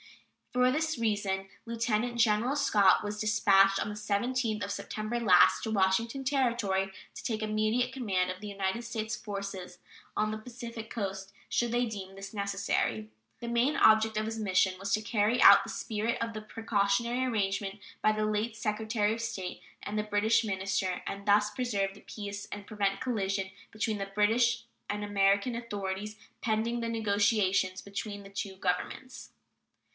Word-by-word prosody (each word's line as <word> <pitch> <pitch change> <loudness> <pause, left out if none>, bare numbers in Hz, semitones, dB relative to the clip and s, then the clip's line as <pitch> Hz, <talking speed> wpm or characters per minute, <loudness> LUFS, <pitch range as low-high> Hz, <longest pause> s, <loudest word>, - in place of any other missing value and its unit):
For 250 0 +3
this 315 +3 0
reason 205 -4 -1 0.2
Lieutenant 235 0 -1
General 230 +3 +3
Scott 210 -10 +4
was 210 0 -4
dispatched, 195 -2 +4
on - - -1
the 210 - -5
17th 215 +2 -1
of 200 - -5
September 215 +2 -3
last, 185 -6 +5
to 220 - -2
Washington 220 +6 +1
Territory 235 -8 +1 0.2
to - - -9
take 220 -2 -2
immediate 215 +4 0
command 190 -8 0
of 185 +1 -9
the 210 - -6
United 200 +3 -2
States 220 -2 -3
forces 195 -3 -6 0.4
on 215 0 +1
the 215 - -4
Pacific 230 -1 -8
Coast, 195 -3 -4 0.2
should 240 -1 0
he 245 +1 +2
deem 195 -4 -7
this 195 +1 -8
necessary. 195 - -1 0.3
The 235 - -5
main 235 +5 +2
object 220 0 +5
of 215 - 0
his 225 0 -4
mission 190 -2 +2
was 200 +1 -4
to 215 - +2
carry 215 +2 +1
out - - +9
the - - -8
spirit 220 +1 -2
of 230 0 -2
the 215 - -5
precautionary 225 +3 0
arrangement 200 -4 -1 0.2
between 215 0 +4
the 215 - +1
late 215 +2 -1
Secretary 215 -1 0
of 230 - -4
State 200 -6 -4 0.2
and 210 +1 -4
the - - 0
British 210 +2 +2
minister, 190 -2 -1
and 200 +1 -6
thus 205 +1 +4
to - - -19
preserve 200 -6 -1
the 200 - -15
peace 205 -1 -7
and 205 0 -7
prevent 200 -2 -1
collision 195 -6 -1 0.2
between 215 -1 -2
the 195 0 -5
British 230 +3 +3 0.3
and 210 0 -2
American 200 +3 +2
authorities 210 -2 -4 0.2
pending 230 +2 0
the 230 0 -2
negotiations 200 -3 +1
between 205 0 -6
the 195 - -11
two 200 -1 -5
Governments. 190 +8 -3
210 Hz, 165 wpm, -30 LUFS, 195-230 Hz, 0.4 s, out